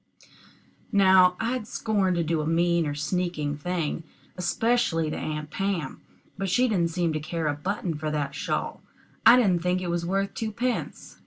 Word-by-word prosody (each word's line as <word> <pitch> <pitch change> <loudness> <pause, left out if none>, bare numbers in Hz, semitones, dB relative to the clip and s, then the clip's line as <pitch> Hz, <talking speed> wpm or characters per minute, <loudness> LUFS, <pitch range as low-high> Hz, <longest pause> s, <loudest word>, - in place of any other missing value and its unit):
Now 190 -3 +6
I'd 230 -1 -2
scorn 200 -6 0
to 170 - +1
do 160 0 0
a 150 - -3
mean 170 0 +2
or 145 - -3
sneaking 155 -1 -2
thing, 165 0 -2 0.3
especially 180 -4 +1
to - - -3
Aunt 150 -1 -4
Pam, 195 -8 -2 0.4
but 195 -1 -1
she 250 +8 +3
didn't 180 -7 +1
seem 170 -1 0
to 155 - -1
care 160 +1 -4
a 150 - +1
button 180 +3 -3
for 155 0 -3
that 145 -2 -2
shawl. 145 - -3 0.5
I 245 - +9
didn't 190 -8 +3
think 180 +1 +1
it 180 -2 -3
was 170 0 -1
worth 195 +3 -1
twopence. 230 +3 -3
175 Hz, 170 wpm, -26 LUFS, 155-195 Hz, 0.5 s, I